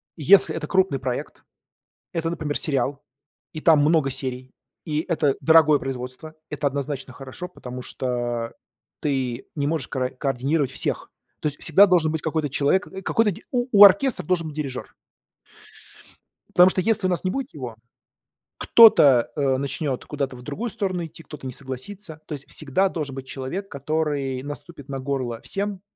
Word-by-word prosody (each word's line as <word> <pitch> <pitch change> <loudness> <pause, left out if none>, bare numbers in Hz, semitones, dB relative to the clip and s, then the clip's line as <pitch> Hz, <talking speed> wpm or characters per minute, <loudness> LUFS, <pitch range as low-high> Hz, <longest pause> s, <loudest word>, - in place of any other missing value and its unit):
если 180 +5 +5
это 155 -2 -4
крупный 190 -7 +2
проект, 125 -1 -5 0.7
это, 165 -1 -2
например, 150 -3 -2
сериал, 140 -1 -1 0.5
и 155 - -6
там 160 -1 +5
много 150 -1 +3
серий, 130 -1 -2 0.3
и 155 -2 -1
это 155 -5 +1
дорогое 160 -2 +6
производство, 130 +4 -6 0.2
это 150 -1 -2
однозначно 140 -1 -3
хорошо, 135 +7 -8
потому 125 -8 -9
что 120 -2 -3 0.5
ты 130 -4 -2
не 145 -1 -1
можешь 155 -5 -1
кра 130 -1 -2
координировать 135 +2 -1
всех. - - -3 0.3
То - - -3
есть 145 -1 -3
всегда 190 +6 +6
должен 175 -5 +3
быть 160 -1 -3
какой-то 160 -2 -1
человек, 145 +9 +1
э, 190 0 -8
какой-то 210 +2 +2 0.2
у 245 0 0
у 205 -1 +9
оркестра 200 +7 +5
должен 170 -3 0
быть 150 - -10
дирижёр. 135 -4 -5 1.6
Потому 180 +1 +8
что 185 - +2
если 205 0 +1
у - - +1
нас 180 - -1
не 185 - +1
будет 270 +4 -4
его, 125 -6 -7 0.8
кто-то, 145 - +6
э, 135 -3 +1
начнёт 140 0 -2
куда-то 140 -3 -3
в 125 - -11
другую 185 - -4
сторону 185 -4 -2
идти, 165 +1 -12
кто-то 145 -3 -9
не 130 - -6
согласится. 155 - -5
То - - -5
есть 140 -2 -7
всегда 160 +6 0
должен 150 -6 -4
быть 130 -1 -8
человек, 145 +11 -5
который 140 -3 -2
наступит 145 0 -9
на 135 -1 -4
горло 130 -4 -3
всем 200 -1 -2
150 Hz, 165 wpm, -23 LUFS, 135-175 Hz, 1.6 s, у